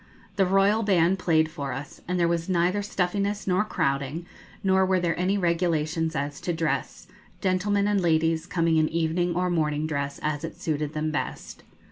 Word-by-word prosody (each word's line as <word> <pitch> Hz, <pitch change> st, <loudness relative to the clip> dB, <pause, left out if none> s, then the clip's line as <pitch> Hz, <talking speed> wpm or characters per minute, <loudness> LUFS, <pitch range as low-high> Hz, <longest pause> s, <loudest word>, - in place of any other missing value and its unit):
The 195 Hz, -2 st, +3 dB
Royal 195 Hz, +3 st, +3 dB
band 190 Hz, -3 st, +3 dB
played 160 Hz, -3 st, +2 dB
for 140 Hz, -5 st, -4 dB
us, 135 Hz, +2 st, -8 dB
and 180 Hz, +1 st, -1 dB
there 170 Hz, -, +3 dB
was 170 Hz, +1 st, -1 dB
neither 180 Hz, +3 st, +2 dB
stuffiness 200 Hz, +1 st, -1 dB
nor 185 Hz, +2 st, +2 dB
crowding, 140 Hz, -4 st, -2 dB, 0.4 s
nor 190 Hz, 0 st, +4 dB
were 185 Hz, 0 st, +2 dB
there 170 Hz, -2 st, 0 dB
any 185 Hz, +3 st, +1 dB
regulations 165 Hz, -2 st, 0 dB
as 145 Hz, 0 st, -3 dB
to 175 Hz, -, -1 dB
dress, 165 Hz, 0 st, -2 dB, 0.3 s
gentlemen 200 Hz, +1 st, +1 dB
and 205 Hz, -2 st, +2 dB
ladies 160 Hz, -1 st, +1 dB
coming 165 Hz, -2 st, +1 dB
in 155 Hz, 0 st, +3 dB
evening 170 Hz, +1 st, 0 dB
or 180 Hz, 0 st, 0 dB
morning 155 Hz, -2 st, 0 dB
dress, 140 Hz, -2 st, -3 dB
as 150 Hz, 0 st, -1 dB
it 165 Hz, -, -6 dB
suited 150 Hz, -1 st, -2 dB
them 155 Hz, 0 st, -1 dB
best. 150 Hz, -, -4 dB
170 Hz, 175 wpm, -26 LUFS, 155-185 Hz, 0.4 s, nor